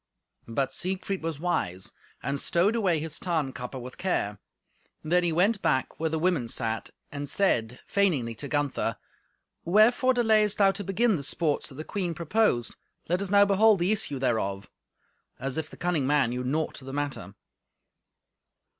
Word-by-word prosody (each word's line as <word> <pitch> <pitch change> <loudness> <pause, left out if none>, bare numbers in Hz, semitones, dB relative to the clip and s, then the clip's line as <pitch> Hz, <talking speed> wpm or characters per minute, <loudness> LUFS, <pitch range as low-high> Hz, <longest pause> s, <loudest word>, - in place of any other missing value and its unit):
But 135 +3 -1
Siegfried 190 +1 -2
was 160 -3 -4
wise, 100 - -1 0.3
and 140 0 -2
stowed 180 +10 +2
away 190 -7 +2
his 160 0 -5
Tarnkappe 135 -7 -3
with 125 +1 -10
care; 105 - -1 0.6
then 175 +3 +2
he 175 - +1
went 195 +6 +2
back 130 - 0
where 160 0 0
the 160 - -1
women 160 -7 +1
sat, 115 -1 -2 0.2
and 145 0 -5
said 125 - +1
feigningly 155 -13 +1
to 145 - -5
Gunther, 140 -6 -1 0.7
"Wherefore 235 +8 +4
delayest 215 -3 +3
thou 195 -1 +5
to 200 +1 -6
begin 205 +2 +2
the - - -5
sports 150 +1 0
that 135 - -12
the 155 - -6
queen 175 -2 -3
proposed, 170 - +1 0.3
let 180 +3 +1
us 200 - -2
now 200 0 +6
behold 205 +2 +5
the 175 +3 +1
issue 170 -9 +1
thereof"—as 120 +4 -4
if 155 - -5
the - - -12
cunning 170 -6 0
man 140 -4 +3
knew 125 +1 -3
naught 150 +3 -2
of 130 - -13
the 135 - -6
matter. 145 -1 -4
160 Hz, 165 wpm, -27 LUFS, 130-195 Hz, 0.7 s, now